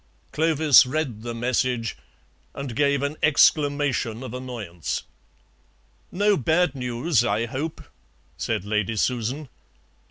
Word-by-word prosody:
Clovis 155 -4 +5
read 130 -6 -2
the 120 0 -5
message 120 -1 -1 0.6
and 140 -4 -5
gave 140 0 +2
an 145 +2 -2
exclamation 145 -5 +2
of 130 - -7
annoyance. 115 - -5 1.1
"No 205 +2 +2
bad 160 +3 +2
news, 125 +1 0
I 115 -1 0
hope," 145 +7 -5 0.5
said 95 - -2
Lady 105 +1 -1
Susan. 125 +6 -1
130 Hz, 105 wpm, -24 LUFS, 115-150 Hz, 1.1 s, Clovis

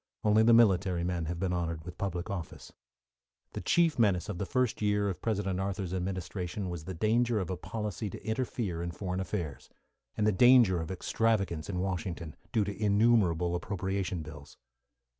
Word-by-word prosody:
Only 105 +1 +5
the 115 +1 +5
military 95 -6 +4
men 85 -2 -1
have 85 +2 -3
been 95 -1 0
honoured 85 -3 -3
with 90 -1 -9
public 90 -2 -2
office. 90 -5 -7 0.8
The - - -4
chief 165 -5 +2
menace 95 -5 +2
of 95 -4 -4
the 100 - -2
first 125 +4 0
year 105 -1 +2
of 95 - -5
President 100 -4 -1
Arthur's 95 -2 -3
administration 90 0 -3
was 85 -3 -6
the 95 - -5
danger 115 +4 +2
of 95 -2 -3
a - - -1
policy 105 +2 -4
to - - -10
interfere 110 -6 -2
in 85 - -3
foreign 90 +1 -4
affairs, 85 -6 -4 0.5
and 105 - +1
the 110 - +4
danger 115 -4 +6
of 80 - -5
extravagance 95 -3 0
in 95 - -3
Washington, 90 -3 -3 0.2
due 110 - +2
to 100 0 -4
innumerable 100 -5 +3
appropriation 95 -1 -2
bills. 75 -2 -11
95 Hz, 175 wpm, -30 LUFS, 85-105 Hz, 0.8 s, danger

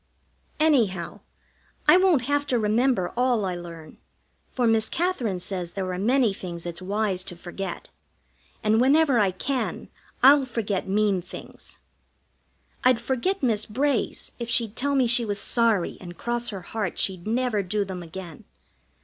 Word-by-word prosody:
Anyhow, 225 - +1 0.7
I - - +8
won't 365 -8 +4
have 285 +2 0
to 250 - +1
remember 220 -3 +1
all 245 -4 +2
I 185 - -2
learn, 170 -3 -9 0.5
for 250 - -1
Miss 225 -1 +2
Katherine 265 - -1
says 180 -2 -5
there 185 -2 -3
are 180 - -4
many 240 +1 +2
things 175 -3 -7
it's 170 +1 -5
wise 195 -1 -1
to 175 - -7
forget, 175 +1 -7 0.7
and 215 +2 +3
whenever 275 -1 +4
I 200 -2 +3
can 255 +8 -3 0.3
I'll 275 +1 +7
forget 215 -6 -2
mean 200 -1 +1
things. 180 - -10 1.1
I'd 255 -2 +4
forget 265 +10 -1
Miss 220 -4 +1
Bray's 265 +2 0
if 235 -1 -4
she'd 230 -2 +1
tell 280 +1 0
me 265 -2 +3
she 240 0 +4
was 205 -3 -1
sorry 220 -3 +1
and 175 -2 -9
cross 240 +2 -1
her 195 -3 -6
heart 205 0 -4
she'd 185 -1 -1
never 235 -2 0
do 200 +2 -1
them 185 -2 -6
again. 170 -2 -9
215 Hz, 155 wpm, -25 LUFS, 185-250 Hz, 1.1 s, I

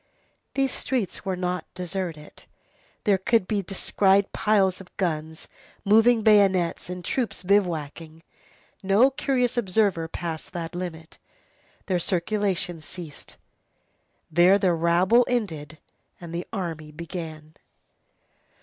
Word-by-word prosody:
These 270 -1 +1
streets 235 -7 -2
were 190 -1 -1
not 180 0 -3
deserted. 180 -4 -5 0.6
There 200 -2 +3
could 190 0 +2
be 205 -2 0
descried 195 +1 +2
piles 195 -3 +2
of 185 - -17
guns, 160 -3 -3 0.4
moving 225 +2 +5
bayonets, 195 -6 +3
and 180 -1 -6
troops 245 -7 -2
bivouacking. 165 -4 -1 0.6
No 205 +8 +4
curious 250 -3 0
observer 195 -6 +1
passed 165 -1 -6
that 165 -1 -5
limit. 170 -2 -7 0.7
There 185 -3 0
circulation 180 -1 -1
ceased. 160 -1 -8 0.9
There 175 +4 +6
the 185 -3 +2
rabble 175 +8 +4
ended 160 - -2 0.4
and 170 -1 -9
the 175 +1 -4
army 165 -7 -5
began. 160 -1 -8
180 Hz, 110 wpm, -25 LUFS, 165-205 Hz, 0.9 s, There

